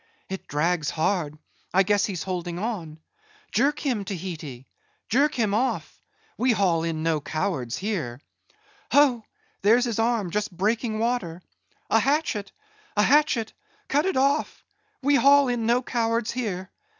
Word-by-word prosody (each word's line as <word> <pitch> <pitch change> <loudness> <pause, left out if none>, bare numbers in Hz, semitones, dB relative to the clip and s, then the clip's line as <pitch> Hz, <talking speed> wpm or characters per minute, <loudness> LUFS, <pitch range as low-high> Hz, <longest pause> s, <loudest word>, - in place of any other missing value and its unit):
It 190 0 -6
drags 160 +1 0
hard; 160 -2 -1 0.4
I 190 - +6
guess 205 +1 +2
he's 185 -6 -4
holding 175 -2 -4
on. 180 -7 -4 0.5
Jerk 280 +6 +2
him, 245 -8 -1
Tahiti! 165 -9 -6 0.4
Jerk 280 +6 +3
him 215 -5 +1
off; 250 +5 -1 0.4
we 250 0 +3
haul 175 -6 +2
in 160 -1 -2
no 160 -2 +1
cowards 145 -5 -2
here. 170 - -3 0.7
Ho! 265 -6 +5 0.4
there's 230 +5 +4
his 230 -2 -2
arm 225 -5 +1
just 210 +2 -1
breaking 220 +2 0
water. 215 -7 -2 0.5
A - - +5
hatchet! 275 -8 0 0.5
a 210 - +5
hatchet! 280 -4 +3 0.4
cut 295 +6 +2
it 380 - 0
off—we 290 +3 0
haul 280 0 +6
in 235 -2 -1
no 245 +2 +3
cowards 230 -2 0
here. 200 -7 -4
215 Hz, 140 wpm, -25 LUFS, 175-250 Hz, 0.7 s, I